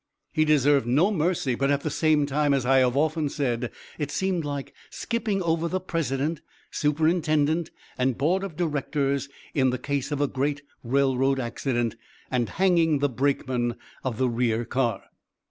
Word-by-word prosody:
He 155 - +2
deserved 145 -4 +3
no 155 - +3
mercy, 165 -7 0
but 135 +3 0
at 140 0 +2
the 155 - -3
same 155 -2 +3
time, 145 0 +2
as 130 -3 -1
I 135 +1 +5
have 125 0 +2
often 155 0 +1
said, 120 -5 -1 0.3
it 145 -2 -2
seemed 180 +2 -1
like 145 -2 -5 0.2
skipping 215 -5 -2
over 165 0 +1
the 185 +2 -1
president, 155 -3 -2 0.3
superintendent, 155 +1 +1 0.3
and 130 -1 +1
board 175 +7 +1
of 190 -6 -5
directors 140 -3 -1 0.2
in 130 -3 +3
the 125 - -1
case 140 +2 -3
of 145 - -1
a 145 - +3
great 145 +2 -2 0.2
railroad 135 +1 +2
accident, 120 -1 -2 0.3
and 120 -3 0
hanging 170 -5 +3
the 145 +1 +1
brakeman 125 -2 0 0.3
of 125 -4 -2
the 130 - +2
rear 120 -1 0
car. 120 -3 -1
140 Hz, 165 wpm, -26 LUFS, 130-155 Hz, 0.3 s, I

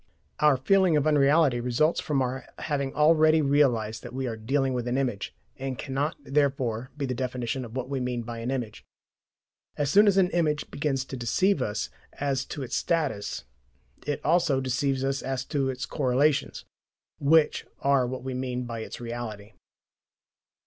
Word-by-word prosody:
Our 150 -3 +5
feeling 185 +4 +3
of 145 - +1
unreality 145 -3 +4
results 125 +7 +1
from 140 -3 0
our 130 0 -4
having 140 -3 -2
already 155 0 +5
realized 120 -7 +2
that - - -9
we 130 0 -2
are 115 -3 -3
dealing 135 +4 0
with 125 -1 -2
an 125 +2 0
image, 125 -7 -2 0.3
and 135 -1 -4
cannot 140 +2 -2
therefore 135 -4 0
be 145 - -2
the 130 - -2
definition 125 0 -3
of 115 0 -9
what 130 -1 -3
we 135 0 -2
mean 125 -1 -2
by 115 0 -6
an 115 +2 -3
image. 125 -5 -4 0.9
As 145 -1 0
soon 205 +4 +6
as 195 -1 +4
an 185 -2 +4
image 155 -3 0
begins 140 -3 -1
to 135 - -7
deceive 160 - +1
us 105 +1 -2 0.2
as 135 -2 -1
to 145 - -6
its 125 - -4
status, 145 - -1 0.6
it 145 - -1
also 155 -4 +3
deceives 135 +1 0
us 135 0 -1
as 135 0 -3
to 135 -2 -1
its 130 -1 -3
correlations, 140 +1 +1 0.5
which 155 +2 +3
are 140 -2 +3
what 130 0 -5
we 130 0 -4
mean 125 -1 -3
by 115 -1 -5
its 110 - -7
"reality." 115 -3 -6
135 Hz, 170 wpm, -27 LUFS, 125-145 Hz, 0.9 s, soon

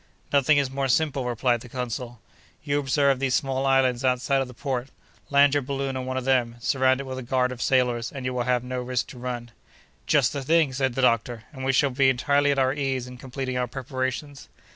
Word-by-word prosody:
"Nothing 140 +1 +4
is 140 -2 +1
more 135 0 -1
simple," 140 0 +1
replied 120 0 0
the 125 - -11
consul. 120 -1 -5 0.4
"You 145 -1 0
observe 140 -1 +2
those 130 -1 +1
small 135 0 0
islands 130 -2 +2
outside 130 +1 +1
of 135 - -3
the 125 - -11
port; 130 -1 -3 0.4
land 140 0 +5
your 145 - +2
balloon 135 0 -3
on 130 0 -4
one 130 0 -2
of 130 - -3
them; 125 -3 +1
surround 130 +1 +2
it - - -3
with 130 0 -5
a - - -5
guard 125 +1 0
of 125 - -7
sailors, 125 -3 +1
and 135 -2 -7
you 130 - -1
will 125 - -1
have 125 0 +1
no 125 0 -4
risk 125 -1 -1
to 125 - -10
run." 120 -1 -5 0.6
"Just 140 -5 +3
the 140 - -3
thing!" 155 0 +2
said 130 -2 -1
the 130 - 0
doctor, 115 -1 +1
"and 130 -2 -8
we 135 - +2
shall 135 +1 +2
be 135 +1 +3
entirely 140 +3 +2
at 140 - +1
our 130 0 +2
ease 135 -3 -2
in 125 0 -11
completing 130 -1 -4
our 125 - 0
preparations." 130 +2 -4
130 Hz, 230 wpm, -25 LUFS, 125-135 Hz, 0.6 s, land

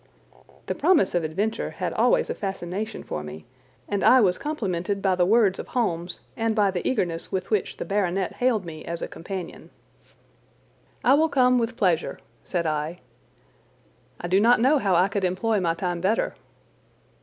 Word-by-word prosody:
The - - -2
promise 350 - +3
of 175 -1 +1
adventure 200 +8 -2
had - - -4
always - - +3
a - - -1
fascination 195 +2 -4
for 75 - -4
me, 75 +1 -9 0.4
and 205 -1 -1
I 260 - +7
was 185 -6 +3
complimented 200 - -2
by 190 -1 +2
the 180 -1 +2
words 210 -3 +3
of - - -6
Holmes 175 -8 -2
and 225 -1 0
by 205 -3 +3
the 180 -2 -2
eagerness 170 -9 -2
with 190 0 -3
which 210 -4 0
the - - -4
baronet 195 -2 0
hailed 240 -6 +1
me 155 -2 -8
as 170 0 -5
a - - -2
companion. 180 0 -7 1.3
"I 255 - +5
will 315 +3 +4
come, 250 -3 +4
with 235 +1 -2
pleasure," 180 -6 +1 0.3
said 175 -2 -2
I. 155 +2 -2 1.2
"I 175 - -4
do 185 +2 +3
not 235 +3 +5
know 275 +5 +4
how 195 -6 +2
I 180 +2 +4
could 200 0 -3
employ 195 +4 +1
my 165 -3 0
time 175 -1 -3
better." 205 +5 +1
195 Hz, 175 wpm, -25 LUFS, 175-225 Hz, 1.3 s, I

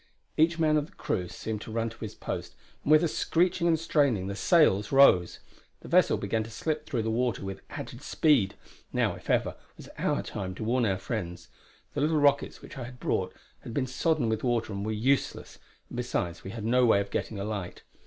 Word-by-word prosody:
Each 160 +2 +3
man 155 -2 +3
of 150 0 -1
the - - -22
crew 90 - -2
seemed 105 +4 -5
to 110 - -8
run 115 0 -1
to 115 - -15
his 110 - -6
post, - - -5 0.3
and 145 - -1
with 155 +2 +7
a - - +3
screeching 170 +2 +1
and 165 -2 +3
straining 140 - +2
the 100 +1 -4
sails 110 - +3
rose. 135 -11 +5 0.4
The - - -11
vessel - - +4
began 110 +3 -1
to 110 - -9
slip 155 +6 -3
through 120 -7 -1
the 110 - -1
water 120 -3 0
with 95 -1 -6
added 120 - -7
speed. 145 -8 +2 0.4
Now, - - +1
if - - -12
ever, - - +1 0.2
was - - -11
our - - 0
time 95 -2 -5
to 110 - -5
warn 120 +1 +2
our 95 -2 +1
friends. 95 -4 -5 0.4
The 145 - -2
little 155 +2 +2
rockets 145 -1 +2
which - - -9
I 120 - -4
had 125 +1 -11
brought - - -1 0.2
had 115 - -9
been 135 - +1
sodden 135 +1 0
with 110 -1 -1
water 120 -4 0
and 100 0 -3
were 110 - -2
useless, 130 +6 -1 0.3
and - - -8
besides 90 -8 -2
we - - -7
had 110 +1 -6
no 125 +2 +3
way 110 -4 +5
of 100 0 -4
getting 105 - -3
a - - -2
light. 100 -4 -5
120 Hz, 220 wpm, -28 LUFS, 105-145 Hz, 0.4 s, with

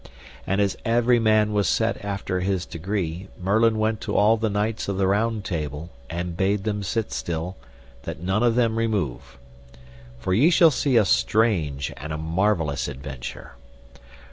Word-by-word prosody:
And 95 +2 +1
as 100 -2 +1
every 120 +1 +3
man 110 -1 +3
was 100 -5 +2
set - - 0
after 100 -2 -2
his 95 -1 -1
degree, 90 +1 -4
Merlin 110 +4 +2
went 110 0 0
to - - -3
all 105 +2 +5
the 110 0 -1
knights 105 +2 -1
of 100 -1 -2
the 95 - +2
Round 105 +2 0
Table, 75 -1 -4 0.2
and 85 0 -4
bade 95 +3 0
them 105 -1 -2
sit 110 +3 -2
still, 85 +2 -3 0.5
that - - -6
none 95 +5 0
of 120 -1 +3
them 115 -2 +2
remove. 100 - -2 0.8
For 60 +9 -2
ye 130 - +5
shall 165 -2 +6
see 135 -2 +1
a 110 - +5
strange 75 - +1
and 75 +4 -7
a 75 - -2
marvellous 80 -2 0
adventure. 65 -2 -7
100 Hz, 165 wpm, -24 LUFS, 85-110 Hz, 0.8 s, shall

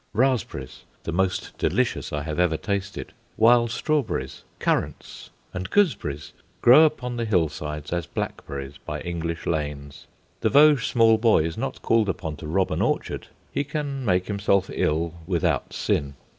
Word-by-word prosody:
Raspberries, 110 - -1 0.2
the - - -3
most 95 +2 -1
delicious - - 0
I 75 -1 -2
have 75 +1 -4
ever 85 -3 +2
tasted, 100 0 -4 0.2
wild 120 +1 +5
strawberries, 120 - -1 0.2
currants, - - -2 0.2
and 90 +1 -4
gooseberries, 130 - 0 0.3
grow 135 +7 +8
upon 125 -5 -2
the 115 - -1
hill 90 -8 +2
sides 75 0 -6
as 85 -2 -2
black - - -4
berries 70 0 -6
by - - -6
English 85 -1 -4
lanes. 75 -2 -4 0.3
The - - +1
Vosges 145 -3 +6
small 115 -2 +4
boy 110 -8 +4
is 80 0 -3
not - - -4
called 115 -3 +3
upon 80 -4 -3
to 75 - -8
rob 95 +4 +1
an - - -1
orchard; - - -1 0.2
he 140 - 0
can 145 -2 -4
make 90 -5 +2
himself 100 -2 +1
ill 80 +2 0
without 90 -4 0
sin. 70 0 -1
95 Hz, 155 wpm, -24 LUFS, 80-120 Hz, 0.3 s, grow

